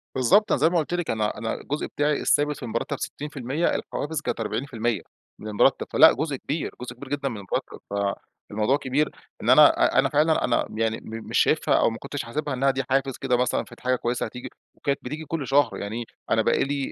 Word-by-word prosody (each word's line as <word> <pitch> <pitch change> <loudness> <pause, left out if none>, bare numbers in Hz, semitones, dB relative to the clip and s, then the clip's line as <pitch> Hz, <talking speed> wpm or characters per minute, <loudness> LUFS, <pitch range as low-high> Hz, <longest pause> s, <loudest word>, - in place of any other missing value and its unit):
بالضبط. 130 - +4
أنا - - +3
زي 160 - +5
ما 175 - +1
قُلت 160 +1 -1
لِك، 175 -2 -2
أنا 105 -1 -1
أنا 110 +1 -2
الجزء 145 +3 -3
بتاعي 145 0 0
الثابت 150 -1 +2
في - - -10
المرتب 115 -1 -3
60%، 145 +2 -2
الحوافز 150 +1 -3
كانت - - -3
40% 115 -1 -2 0.4
من 110 - -8
المرتب. 105 -1 +2
فلأ - - +8
جزء 150 +1 -2
كبير، 145 +4 -3
جزء 125 -1 -6
كبير 130 +2 -10
جدًا 140 -1 -1
من 115 - -6
المرتب. 100 -2 -4 0.7
فالموضوع 110 +6 +1
كبير 145 +2 0 0.3
إن - - 0
أنا - - +9 0.3
أ - - +7
أنا - - +3
فعلًا 155 +2 +2
أنا - - +1
يعني 115 0 0
م 110 0 -8
مش - - 0
شايفها، - - +3
أو - - +4
ما 115 - -6
كنتش 140 +2 -5
حاسبها 145 +4 -3
إنّها 135 +1 +2
دي 135 0 -2
حافز 135 0 +1
كده 125 -2 +1
مثلًا 125 0 +1
فدي - - -15
حاجة 130 0 +1
كويّسة 120 0 -2
هتيجي. 125 0 -7 0.3
وكانت 140 -1 -1
بتيجي 150 +5 -6
كل 145 -2 -3
شهر، 135 -3 +3
يعني 110 +3 -4 0.3
أنا - - +4
بقي - - +2
لي 140 0 -2
135 Hz, 215 wpm, -25 LUFS, 120-145 Hz, 0.7 s, أنا